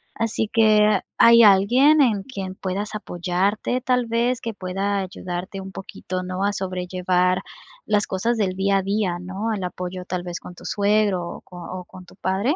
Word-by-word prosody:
Así 225 Hz, -1 st, -1 dB
que, 215 Hz, -2 st, +4 dB, 0.2 s
¿hay 235 Hz, 0 st, +8 dB
alguien 245 Hz, +10 st, +6 dB
en 210 Hz, -7 st, +2 dB
quien 195 Hz, -8 st, -6 dB
puedas 200 Hz, +3 st, -4 dB
apoyarte, 195 Hz, +6 st, -1 dB
tal 250 Hz, -2 st, +1 dB
vez, 235 Hz, +2 st, 0 dB
que 230 Hz, -1 st, -4 dB
pueda 195 Hz, +2 st, -2 dB
ayudarte 185 Hz, 0 st, -5 dB
un 190 Hz, 0 st, -8 dB
poquito, 185 Hz, -1 st, -6 dB
¿no?, 185 Hz, +1 st, -3 dB
a 205 Hz, -, +2 dB
sobrellevar 180 Hz, -1 st, 0 dB, 0.4 s
las 210 Hz, 0 st, +1 dB
cosas 230 Hz, +6 st, 0 dB
del 190 Hz, -3 st, 0 dB
día 195 Hz, +1 st, +2 dB
a -, -, +1 dB
día, 195 Hz, -3 st, -1 dB
¿no?, 195 Hz, +5 st, -3 dB
el 195 Hz, -3 st, -3 dB
apoyo, 180 Hz, 0 st, -5 dB
tal 180 Hz, -1 st, -3 dB
vez, 175 Hz, -1 st, -5 dB
con 180 Hz, -, -11 dB
tu -, -, -14 dB
suegro 205 Hz, -2 st, +2 dB
o -, -, -8 dB
co 180 Hz, -, -14 dB
o 180 Hz, +1 st, -7 dB
con 185 Hz, +1 st, -13 dB
tu -, -, -17 dB
padre? 195 Hz, -, 0 dB
195 Hz, 180 wpm, -23 LUFS, 185-215 Hz, 0.4 s, hay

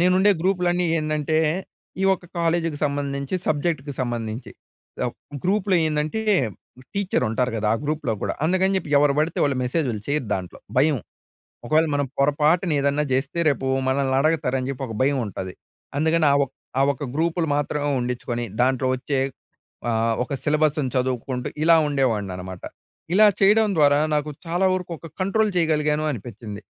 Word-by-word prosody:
నేనుండే 185 Hz, +3 st, +4 dB
గ్రూపులన్నీ 180 Hz, -2 st, +1 dB
ఏందంటే, 155 Hz, 0 st, 0 dB, 0.6 s
ఈ -, -, +3 dB
ఒక్క 180 Hz, -, -13 dB
కాలేజీకి 165 Hz, -2 st, 0 dB
సంబంధించి, 140 Hz, +1 st, -2 dB
సబ్జెక్ట్‌కి 150 Hz, -2 st, -1 dB
సంబంధించి. 120 Hz, -1 st, -4 dB, 0.5 s
ఎవ్ -, -, -2 dB, 0.3 s
గ్రూప్‌లో 195 Hz, -1 st, +2 dB
ఏందంటే, 155 Hz, +7 st, -1 dB, 0.7 s
టీచ్చరుంటారు 125 Hz, -, 0 dB
గదా, 105 Hz, 0 st, 0 dB
ఆ -, -, 0 dB
గ్రూప్‍లో 150 Hz, -5 st, -1 dB
గూడా, -, -, -1 dB
అందుకని 185 Hz, +3 st, +2 dB
చెప్పి 165 Hz, -5 st, -3 dB
ఎవరు 145 Hz, -1 st, +4 dB
పడితే 155 Hz, +2 st, 0 dB
వాళ్ళు 140 Hz, -2 st, +1 dB
మెసేజులు 125 Hz, -5 st, -1 dB
చెయ్యరు 145 Hz, -4 st, -1 dB
దాంట్లో. 90 Hz, -2 st, -6 dB, 0.2 s
భయం. 150 Hz, -1 st, +4 dB, 0.7 s
ఒకవేళ 155 Hz, +5 st, +3 dB
మనం 145 Hz, -1 st, +1 dB
పొరపాటున 150 Hz, +5 st, +2 dB
ఏదన్నా 140 Hz, +2 st, +1 dB
జేస్తే, 135 Hz, +6 st, 0 dB
రేపూ 135 Hz, -1 st, -1 dB, 0.2 s
మనల్నడగతారని 135 Hz, 0 st, +1 dB
జెప్పి 135 Hz, 0 st, -4 dB
ఒక 110 Hz, -, -6 dB
భయముంటది. 115 Hz, -9 st, -1 dB, 0.5 s
అందుకని 160 Hz, +1 st, +2 dB
ఆ -, -, +4 dB
ఒక్ 135 Hz, -, -20 dB, 0.3 s
ఆ -, -, +4 dB
ఒక్క 140 Hz, +1 st, -7 dB
గ్రూపులు 165 Hz, +1 st, 0 dB
మాత్రమే 145 Hz, 0 st, -1 dB
ఉండిచ్చుకొని, 120 Hz, -1 st, -3 dB, 0.2 s
దాంట్లో 130 Hz, 0 st, +2 dB
ఒచ్చే 135 Hz, +1 st, -1 dB, 0.7 s
ఆహ్, 115 Hz, 0 st, +1 dB
ఒక 140 Hz, -, -6 dB
సిలబస్సును 150 Hz, -2 st, +1 dB
చదువుకుంటూ, 125 Hz, 0 st, -1 dB, 0.2 s
ఇలా 165 Hz, +1 st, +6 dB
ఉండేవాడిననమాట. 100 Hz, -10 st, -2 dB, 0.5 s
ఇలా 215 Hz, +3 st, +7 dB
చెయ్యడం 210 Hz, +2 st, +5 dB
ద్వారా, 145 Hz, -1 st, +5 dB
నాకు 150 Hz, 0 st, 0 dB, 0.2 s
చాలా 175 Hz, +3 st, +1 dB
వరుకు 180 Hz, -1 st, -3 dB
ఒక 165 Hz, -, -10 dB
కంట్రోల్ 210 Hz, +3 st, +2 dB
చెయగలిగాను 155 Hz, -2 st, +1 dB
అనిపిచ్చింది. 105 Hz, -3 st, -7 dB
145 Hz, 140 wpm, -23 LUFS, 130-165 Hz, 0.7 s, ఇలా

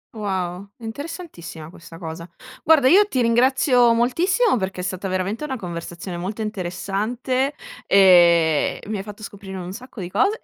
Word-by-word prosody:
Wow, 190 Hz, -2 st, -3 dB
è 235 Hz, -, -17 dB
interessantissima 225 Hz, -, -8 dB
questa 165 Hz, -1 st, -13 dB
cosa. 165 Hz, 0 st, -8 dB, 0.3 s
Guarda, 300 Hz, -4 st, +5 dB
io 405 Hz, +7 st, +6 dB
ti 260 Hz, -, -2 dB
ringrazio 245 Hz, 0 st, +4 dB
moltissimo, 345 Hz, -, +2 dB
perché 190 Hz, -2 st, -3 dB
è -, -, -6 dB
stata 185 Hz, +1 st, -3 dB
veramente 190 Hz, +8 st, -2 dB
una 265 Hz, -4 st, -3 dB
conversazione 175 Hz, -1 st, -6 dB
molto 205 Hz, +5 st, -4 dB
interessante, 215 Hz, +8 st, -2 dB, 0.3 s
e 170 Hz, -5 st, +5 dB
mi 210 Hz, 0 st, -3 dB
hai 195 Hz, -, -5 dB
fatto 210 Hz, +1 st, -10 dB
scoprire 195 Hz, -2 st, -8 dB
un 180 Hz, +1 st, -6 dB
sacco 250 Hz, -2 st, -9 dB
di 175 Hz, 0 st, -6 dB
cose, 420 Hz, +2 st, +2 dB
200 Hz, 155 wpm, -22 LUFS, 180-255 Hz, 0.3 s, io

